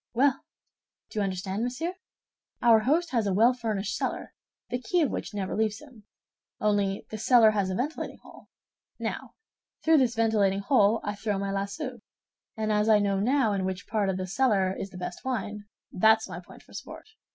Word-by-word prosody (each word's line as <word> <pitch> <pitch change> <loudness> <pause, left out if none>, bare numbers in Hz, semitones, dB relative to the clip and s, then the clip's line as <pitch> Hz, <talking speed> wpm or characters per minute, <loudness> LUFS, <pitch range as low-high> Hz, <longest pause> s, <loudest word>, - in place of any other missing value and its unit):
Well, 270 +2 +3 0.7
do 215 - -3
you - - +2
understand, 190 +1 -3
monsieur? 255 +9 -2 0.7
Our 230 -2 +6
host 315 +9 +1
has 230 -5 +1
a 195 - +1
well 230 +5 +5
furnished 215 -5 -2
cellar - - -3 0.4
the 245 0 -2
key 345 +9 +1
of 285 - 0
which - - -4
never 190 -2 -2
leaves 215 0 0
him; 255 -9 -16 0.5
only 200 -2 0
this 215 0 -5
cellar 235 -4 +6
has 200 -3 0
a 185 - -2
ventilating 285 +9 -3
hole. - - -16 0.5
Now - - -5 0.5
through 320 -1 +5
this 250 -2 +2
ventilating 210 -4 +2
hole 215 -1 +3
I 205 - -2
throw 205 0 -2
my 195 0 -2
lasso, 235 +7 -4 0.6
and 215 0 -1
as 210 +1 +2
I 215 - +7
now 200 -1 +1
know 245 0 +2
in 195 -1 -1
which 190 0 -3
part 210 -3 0
of 190 - -1
the 185 - -3
cellar 195 -2 +1
is 195 - -5
the 185 - -11
best 180 0 -6
wine, 210 -5 -3 0.3
that's 220 +3 +4
my - - -7
point - - -15
for - - -19
sport. - - -9
215 Hz, 190 wpm, -27 LUFS, 195-245 Hz, 0.7 s, I